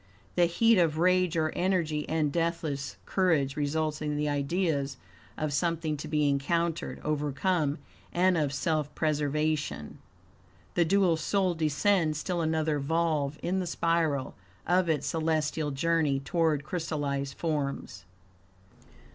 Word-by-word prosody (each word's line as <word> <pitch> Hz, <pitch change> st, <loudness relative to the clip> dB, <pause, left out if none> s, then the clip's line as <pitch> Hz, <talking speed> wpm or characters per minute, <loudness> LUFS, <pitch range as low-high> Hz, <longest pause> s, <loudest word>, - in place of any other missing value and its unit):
The 175 Hz, -, +4 dB
heat 225 Hz, +5 st, +4 dB
of 160 Hz, -3 st, +2 dB
rage 180 Hz, 0 st, +3 dB
or 155 Hz, -1 st, +1 dB
energy 170 Hz, -5 st, 0 dB
and 155 Hz, -2 st, +1 dB
deathless 160 Hz, -4 st, -2 dB
courage 160 Hz, -8 st, +1 dB
results 155 Hz, +1 st, -1 dB
in 150 Hz, -1 st, -2 dB
the 150 Hz, 0 st, 0 dB
IDEAS 145 Hz, -1 st, 0 dB, 0.4 s
of 155 Hz, -1 st, -2 dB
something 160 Hz, +1 st, 0 dB
to 150 Hz, -, -6 dB
be 150 Hz, -1 st, +1 dB
encountered, 165 Hz, +4 st, 0 dB
overcome, 150 Hz, +1 st, 0 dB, 0.3 s
and 180 Hz, +1 st, +3 dB
of 150 Hz, -4 st, +1 dB
self 150 Hz, 0 st, -1 dB
preservation. 150 Hz, -, -1 dB, 0.7 s
The 175 Hz, -, +3 dB
dual 185 Hz, -1 st, +3 dB
soul 185 Hz, +3 st, +1 dB
descends 160 Hz, +1 st, +1 dB
still 175 Hz, +2 st, -2 dB
another 160 Hz, -2 st, 0 dB
volve 150 Hz, -1 st, 0 dB
in 190 Hz, +2 st, 0 dB
the 180 Hz, -, -2 dB
spiral 165 Hz, -5 st, 0 dB, 0.3 s
of 180 Hz, 0 st, +2 dB
its 155 Hz, -3 st, +1 dB
celestial 155 Hz, -1 st, 0 dB
journey 150 Hz, 0 st, +1 dB
toward 150 Hz, +1 st, 0 dB
crystallized 145 Hz, -4 st, -3 dB
forms. 140 Hz, -, -3 dB
155 Hz, 125 wpm, -29 LUFS, 145-170 Hz, 0.7 s, The